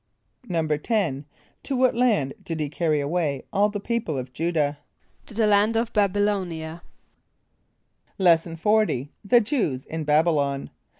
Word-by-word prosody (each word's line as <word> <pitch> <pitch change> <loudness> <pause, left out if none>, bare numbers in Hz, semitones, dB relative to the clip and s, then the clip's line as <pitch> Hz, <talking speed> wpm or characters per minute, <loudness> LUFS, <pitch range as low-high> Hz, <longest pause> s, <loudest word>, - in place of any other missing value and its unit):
= 250 - -31
=10.= 160 - -1 0.4
To 275 - -3
what 255 0 +3
land 215 - +1
did 165 -1 -4
he 150 -2 -2
carry 155 0 0
away 145 -2 -1
all 205 +1 +3
the 205 0 -4
people 215 - -2
of 125 0 -6
J[=u]´dah? 155 -3 0 0.5
=To - - -11
the 225 0 +2
land 210 +2 +3
of 230 0 -1
B[)a]b 205 -2 +2
[)y] 205 - +4
l[=o]´n[)i] 190 -6 -1
a.= 160 +2 -8 1.4
Lesson 170 -3 +3
XL. 190 - +1
The 235 +4 +5
Jews 205 - -1
in 160 0 -4
Babylon. 150 -2 +1
170 Hz, 155 wpm, -24 LUFS, 150-210 Hz, 1.4 s, The